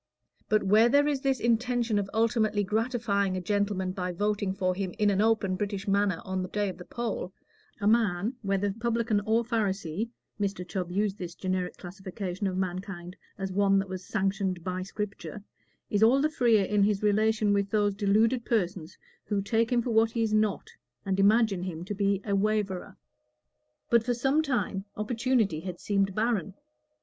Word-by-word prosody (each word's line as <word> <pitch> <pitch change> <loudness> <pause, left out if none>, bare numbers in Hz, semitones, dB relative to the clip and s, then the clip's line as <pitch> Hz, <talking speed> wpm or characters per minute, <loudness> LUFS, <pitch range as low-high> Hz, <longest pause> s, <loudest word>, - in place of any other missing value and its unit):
But 215 0 +3
where 215 +4 +5
there 285 +3 +4
is 285 -3 0
this 270 -2 +1
intention 235 -1 +1
of 200 -1 -3
ultimately 220 -2 +1
gratifying 210 -2 0
a - - -1
gentleman 200 0 -1
by 180 -1 -3
voting 205 +1 -1
for 185 -1 0
him 185 -1 -4
in 210 -1 +3
an 195 0 +2
open 215 -4 +2
British 200 0 -3
manner 200 -3 +1
on 190 -1 -2
the 185 - -4
day 205 0 -1
of 180 -1 -8
the 180 - -9
poll, 235 -6 -4 0.5
a 205 - -3
man, 215 -1 +2
whether 195 -1 0
Publican 230 -1 0
or 225 +2 +3
Pharisee 205 -3 -1 0.3
(Mr. 195 -3 -2
Chubb 180 -1 -3
used 205 +1 -1
this 175 -1 -6
generic 185 -1 -2
classification 190 +1 -5
of 185 -1 -2
mankind 185 -1 -4 0.2
as 195 -1 -4
one 195 +1 +3
that 195 0 -1
was 185 0 -5
sanctioned 190 -3 -1
by 185 0 -3
Scripture), 205 +1 -6 0.5
is 205 - +1
all 235 +5 +6
the 300 +2 +2
freer 230 -8 +3
in 205 +1 +1
his 205 0 +2
relation 215 0 +2
with 200 0 +1
those 205 -1 +2
deluded 220 +4 +2
persons 185 -7 -2 0.3
who 205 -2 0
take 225 +4 0
him 240 -1 +2
for 240 - -2
what 225 0 +4
he 230 0 -1
is 215 -1 0
not, 215 -1 +1 0.3
and 195 0 0
imagine 205 -1 +4
him 175 -2 -5
to 205 - -4
be 200 -1 +1
a 200 -2 0
waverer. 200 -2 -1 0.9
But 235 -1 +5
for 245 +1 0
some 270 +6 +2
time 210 -9 -1
opportunity 225 -5 +1
had 180 +1 -6
seemed 195 -2 0
barren. 215 -5 0
205 Hz, 180 wpm, -28 LUFS, 190-225 Hz, 0.9 s, all